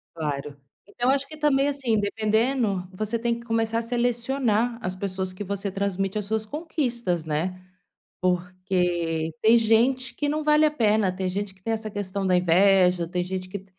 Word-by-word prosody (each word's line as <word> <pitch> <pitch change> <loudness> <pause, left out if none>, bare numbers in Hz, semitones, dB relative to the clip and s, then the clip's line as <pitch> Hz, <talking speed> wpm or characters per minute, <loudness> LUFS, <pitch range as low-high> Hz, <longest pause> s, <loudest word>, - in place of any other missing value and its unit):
Claro, 145 -2 -4 0.3
então 240 +4 -1
acho 275 0 +1
que 310 - -10
também 290 -2 +2
assim 260 -6 0
dependendo, 215 -1 0
você 215 +4 -2
tem 235 0 -1
que 235 - -13
começar 225 0 0
a - - -1
selecionar 240 -1 0
as 185 +1 -3
pessoas 190 -1 -3
que 195 +3 -6
você 200 0 -3
transmite 195 +1 -1
as 210 - -3
suas 220 +2 -1
conquistas, 240 - -2
né, 175 +4 -2 0.6
porque 180 -3 0
tem 225 +2 +6
gente 235 +3 +2
que 290 +4 -1
não 305 +1 -1
vale 300 +1 +5
a 300 - +3
pena, 215 -7 +2
tem 185 0 -3
gente 195 +1 -3
que 190 - -27
tem 225 +4 -1
essa 220 -1 -3
questão 200 -1 -3
da 185 -1 +3
inveja, 180 0 +4
tem 180 0 -1
gente 185 0 -5
que 195 0 -7
205 Hz, 180 wpm, -25 LUFS, 185-235 Hz, 0.6 s, tem